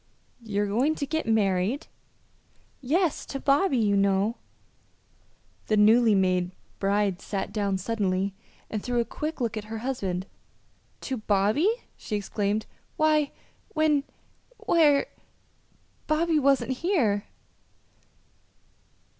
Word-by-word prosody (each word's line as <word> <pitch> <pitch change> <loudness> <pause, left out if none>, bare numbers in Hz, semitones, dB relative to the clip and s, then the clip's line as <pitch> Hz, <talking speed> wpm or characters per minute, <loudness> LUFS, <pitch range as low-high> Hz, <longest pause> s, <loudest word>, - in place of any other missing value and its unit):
"You're 205 -2 -1
going 250 +10 +1
to 285 - -3
get 315 0 -2
married!" 210 - +1 1.0
"Yes; 320 +5 +1
to 275 - -5
Bobby, 280 +2 +2
you 210 -3 +2
know." 200 +3 +2 1.3
The 215 - +2
newly 220 +1 +5
made 185 -2 +2 0.3
bride 200 -1 +1
sat 195 -2 -4
down 200 -3 0
suddenly, 195 -1 -1 0.3
and 215 - -4
threw 245 +1 -1
a 235 - +1
quick 305 +5 -5
look 230 -3 -1
at 210 - -5
her 220 +1 -6
husband. 190 -9 -2 0.8
"To 265 - -3
Bobby!" 215 - +2 0.3
she 215 - -4
exclaimed. 205 +1 -1 0.3
"Why, 305 -2 +3 0.5
when 305 -2 +3 0.5
where 295 -4 +3 1.0
Bobby 315 0 +2
wasn't 275 -1 +2
here." 250 - +1
220 Hz, 110 wpm, -26 LUFS, 200-285 Hz, 1.3 s, newly